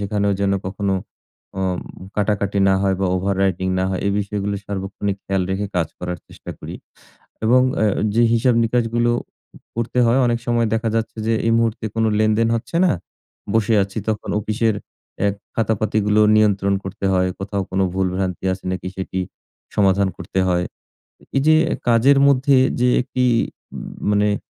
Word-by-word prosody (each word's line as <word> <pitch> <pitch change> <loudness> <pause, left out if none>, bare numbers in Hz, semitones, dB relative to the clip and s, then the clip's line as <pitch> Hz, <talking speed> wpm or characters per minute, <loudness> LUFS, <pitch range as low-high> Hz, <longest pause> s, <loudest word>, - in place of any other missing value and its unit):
সেখানেও 100 0 0
যেন 100 0 +2
কখনো 95 0 -1 0.7
অম 95 -2 -1 0.4
কাটাকাটি 100 -1 0
না 95 - +4
হয় 95 -1 +2
বা, 95 - +2
overwriting 95 -1 0
না 95 - +1
হয়। 95 - -2
এই 100 - +1
বিষয়গুলো 100 0 -2
সার্বক্ষণিক 100 0 -3
খেয়াল 95 -1 0
রেখে 100 +2 -1
কাজ 85 -3 +1
করার 90 -1 -4
চেষ্টা - - -10
করি। - - -8 0.7
এবং 125 +3 +5 0.2
অ্যা 110 - +2 0.3
যে 115 - +4
হিসাব-নিকাসগুলো 115 0 +2 0.5
উ - - -12 0.2
করতে 115 +1 -2
হয় 120 +3 +3
অনেক 120 -1 +1
সময় 120 -1 +2
দেখা 115 +1 0
যাচ্ছে 115 0 -2
যে, - - +3
এই 115 - +3
মুহূর্তে 115 -1 0
কোন 115 0 +1
লেনদেন 110 +1 +2
হচ্ছে 125 +8 -5
না, - - +3 0.6
বসে 110 0 +3
আছি। 100 +3 -5
তখন 110 -2 -2
অফিসের 110 +1 0 0.5
এ - - +4 0.3
খাতাপাতিগুলো 110 -1 +1 0.2
নিয়ন্ত্রণ 100 -2 +3
করতে 95 +1 -6
হয়। 90 0 +2
কোথাও 100 0 -2
কোনো 95 0 +1
ভুল-ভ্রান্তি 95 -1 -1
আছে 95 - -7
নাকি 95 0 -4
সেটি 95 0 -3 0.6
সমাধান 100 -1 +3
করতে 95 +1 -2
হয়। 90 -1 +1 0.6
এ - - -18
এইযে 155 +3 +4 0.3
কাজের 125 +4 +5
মধ্যে 135 0 +4 0.2
যে 125 - +4
একটি 125 0 -1 0.5
উম - - -7 0.2
মানে 105 0 +3
ম - - -45
105 Hz, 160 wpm, -20 LUFS, 95-115 Hz, 0.7 s, এবং